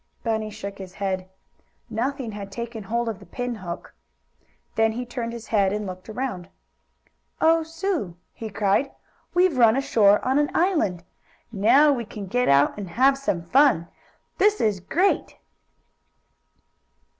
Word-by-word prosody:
Bunny 220 -2 -1
shook 200 -2 -8
his 185 -1 -9
head. 190 -2 -3 0.6
Nothing 245 +2 -3
had 200 -1 -8
taken 230 -1 -6
hold 235 +4 -1
of 220 -4 -3
the 195 - -14
pin 245 +6 -4
hook. 180 -6 -7 0.8
Then 225 0 +2
he 245 +2 -4
turned 240 -1 -4
his 235 -1 -8
head 200 -3 +3
and 210 +1 -2
looked 185 +1 -8
around. 215 -7 -4 0.9
"Oh, 330 +1 +4
Sue!" 325 - -3 0.2
he 225 - -7
cried. 210 +6 +1 0.4
"We've 360 -3 +4
run 230 -1 +6
ashore 210 -6 +4
on 265 +3 +2
an 295 - +1
island. 315 - +1 0.5
Now 270 +8 +5
we 240 -3 -2
can 205 -1 -7
get 245 +6 0
out 140 +1 +4
and 195 -3 -6
have 265 +9 +4
some 235 -11 -2
fun! 210 - +3 0.5
This 420 +1 +4
is 210 -4 +1
great!" 350 - 0
225 Hz, 145 wpm, -24 LUFS, 195-270 Hz, 0.9 s, run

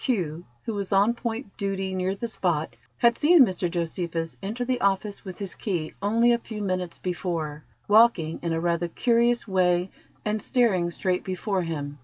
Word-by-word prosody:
who 175 - -1 0.2
was 205 -4 -3
on 200 +4 +4
point 235 -2 -5
duty 195 -1 -2
near 185 +1 -1
the 235 +4 -4
spot, 175 -7 -1 0.2
had 235 0 +4
seen 305 -1 +6
Mr 185 -3 -2
Josephus 165 -1 -3
enter 220 +5 -3
the 255 0 -1
office 200 +1 0
with 185 -3 -8
his 200 -2 -5
key 175 -7 -3
only 230 +4 +3
a 235 - +1
few 220 -2 -7
minutes 185 -3 -2
before, 160 -4 -3 0.2
walking 205 -7 +4
in 170 - -2
a 165 - 0
rather 170 0 0
curious 235 +5 +2
way, 180 -2 +2 0.4
and 215 0 0
staring 200 -9 +2
straight 180 +1 -1
before 190 +1 -1
him. 145 -4 -4
190 Hz, 170 wpm, -26 LUFS, 170-220 Hz, 0.4 s, seen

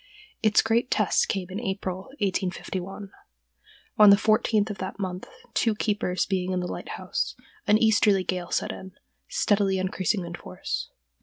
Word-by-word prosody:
Its 215 -2 +4
great 230 +3 +1
test 210 - +2
came 190 -2 -1
in 195 - -3
April, 190 -4 -3 0.2
1851. 195 0 -3 0.9
On 210 -1 +10
the 200 - +8
fourteenth 215 0 +2
of 200 - -7
that 190 0 -5
month, 185 -2 -4 0.3
two 225 -2 +2
keepers 205 -4 0
being 185 -1 -1
in 185 - 0
the 180 - -2
lighthouse, - - -3 0.3
an 210 0 +6
easterly 210 -3 +4
gale 180 -1 -3
set - - 0
in, 190 -1 -9 0.3
steadily 200 -2 +2
increasing 185 +1 -1
in 170 - -7
force.... - - -5
195 Hz, 150 wpm, -26 LUFS, 185-210 Hz, 0.9 s, On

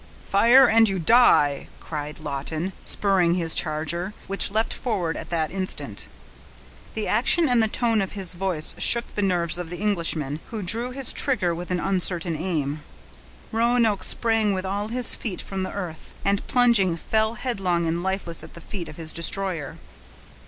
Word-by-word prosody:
"Fire 235 +7 +5
and 225 -1 +4
you 195 - -2
die!" 165 - +3
cried 150 -1 -7
Lawton, 155 +5 -5
spurring 185 -4 +2
his 165 -3 +5
charger, 165 +5 -1
which 195 0 0
leaped 220 +3 -1
forward 190 -10 -3
at - - -8
the 160 -2 -1
instant. 190 0 -2 0.9
The 220 - -3
action 280 +9 +3
and 245 -3 +3
the 220 - +2
tone 225 -1 0
of 190 - -5
his 190 -4 -2
voice 175 -4 -2
shook 235 0 +2
the 205 - -3
nerves 175 -3 0
of 175 -2 -6
the 175 - -6
Englishman, 165 -8 -1
who 220 -3 -6
drew 230 +7 +1
his 260 0 +3
trigger 210 -11 0
with 175 +1 -7
an 180 -1 -1
uncertain 180 -3 +1
aim. 155 -3 -3 0.7
Roanoke 230 -3 +1
sprang 225 -3 +3
with 185 0 -5
all 200 +2 -3
his 245 +1 +5
feet 200 -7 -5
from 195 -1 -6
the 185 - -4
earth, 175 -5 -8
and, 200 0 -1
plunging, 235 -9 +3
fell 220 +5 -1
headlong 190 -9 -2
and 165 +1 -2
lifeless 190 -2 -2
at - - -13
the - - -10
feet 175 0 -7
of - - -11
his 160 -1 -4
destroyer. 170 -3 -1
190 Hz, 170 wpm, -23 LUFS, 170-220 Hz, 0.9 s, Fire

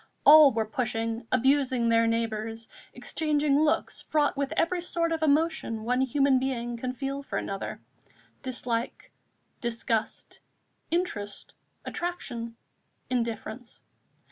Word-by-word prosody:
All 300 -1 +10
were 225 -2 0
pushing, 225 0 -2
abusing 260 -2 +2
their 230 0 +4
neighbours, 225 0 -2 0.2
exchanging 295 -2 +1
looks 310 0 0
fraught 295 -2 +1
with 280 0 -2
every 345 +2 +1
sort 335 -1 0
of 325 -1 -1
emotion 305 -7 +1
one 250 +3 +1
human 265 0 +3
being 240 -2 -2
can 250 +2 -4
feel 275 +1 -4
for 280 - -4
another, 195 0 -4 0.6
dislike, 245 -2 -3 0.5
disgust, 230 -2 -2 0.5
interest, 230 - -3 0.3
attraction, 245 -10 -4 0.6
indifference. 235 0 -4
255 Hz, 110 wpm, -28 LUFS, 230-290 Hz, 0.6 s, All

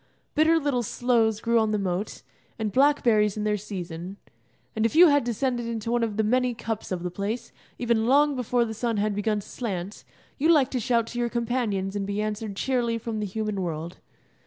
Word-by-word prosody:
Bitter 320 +2 +4
little 280 -5 0
sloes 230 -2 +1
grew 235 +1 +2
on 220 -1 +1
the 215 - +1
moat, 195 +1 -3 0.3
and 220 -2 -2
blackberries 235 -6 +3
in 210 - -2
their 210 0 +1
season; 185 -2 -6 0.6
and 220 - 0
if 230 - +1
you 345 +1 +8
had 285 -2 +3
descended 240 0 -1
into 230 -1 -3
one 240 0 +2
of 220 -3 -2
the 220 - +2
many 250 +2 +1
cups 225 -3 -5
of 180 -2 -2
the 180 - -3
place, 220 +6 -4 0.3
even 235 -2 +1
long 285 +2 +4
before 245 -1 +1
the 220 - -5
sun 230 0 -1
had 210 +1 +1
begun 210 +1 0
to - - -15
slant, 200 -4 -5 0.4
you 310 +4 +3
liked 280 -5 +4
to 255 - -1
shout 235 -1 +1
to 240 +1 -6
your 240 0 0
companions 230 -5 -1
and 200 -1 -2
be 200 +1 -2
answered 215 -1 -3
cheerily 240 0 0
from 225 -1 -4
the 210 - -2
human 210 0 -3
world. 165 0 -4
225 Hz, 205 wpm, -26 LUFS, 205-245 Hz, 0.6 s, you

